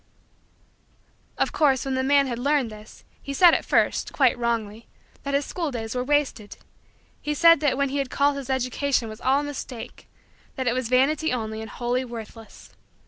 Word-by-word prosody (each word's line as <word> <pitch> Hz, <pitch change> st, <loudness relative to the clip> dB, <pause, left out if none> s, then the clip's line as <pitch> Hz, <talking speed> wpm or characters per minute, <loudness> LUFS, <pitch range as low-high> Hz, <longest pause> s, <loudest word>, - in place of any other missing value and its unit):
Of -, -, 0 dB
course, 275 Hz, -4 st, +2 dB
when 270 Hz, -, -2 dB
the 260 Hz, -, 0 dB
man 280 Hz, +1 st, +3 dB
had 240 Hz, -3 st, -4 dB
learned 275 Hz, -3 st, +1 dB
this, 215 Hz, 0 st, -13 dB, 0.2 s
he 275 Hz, -, -6 dB
said 350 Hz, +3 st, +7 dB
at -, -, +1 dB
first, -, -, +1 dB
quite 265 Hz, -4 st, +3 dB
wrongly, 230 Hz, -2 st, -3 dB, 0.3 s
that 280 Hz, 0 st, -2 dB
his 280 Hz, 0 st, +1 dB
school 335 Hz, -4 st, -3 dB
days 225 Hz, -4 st, -5 dB
were 250 Hz, 0 st, -1 dB
wasted. 270 Hz, -6 st, -1 dB, 0.6 s
He 295 Hz, 0 st, -2 dB
said 335 Hz, 0 st, +6 dB
that 285 Hz, -4 st, +1 dB
what 280 Hz, -1 st, 0 dB
he 285 Hz, -, -2 dB
had 275 Hz, -2 st, -2 dB
called 285 Hz, +2 st, +2 dB
his 275 Hz, -1 st, -7 dB
education 260 Hz, -1 st, 0 dB
was 215 Hz, 0 st, -9 dB
all 270 Hz, +2 st, +2 dB
a -, -, -5 dB
mistake 270 Hz, -4 st, -8 dB, 0.5 s
that 260 Hz, -, -3 dB
it 240 Hz, -, +2 dB
was 255 Hz, -2 st, -2 dB
vanity 285 Hz, +5 st, +2 dB
only 220 Hz, -3 st, -3 dB
and 220 Hz, -, -8 dB
wholly 245 Hz, +1 st, -2 dB
worthless. 225 Hz, -2 st, -10 dB
260 Hz, 190 wpm, -24 LUFS, 235-280 Hz, 0.6 s, said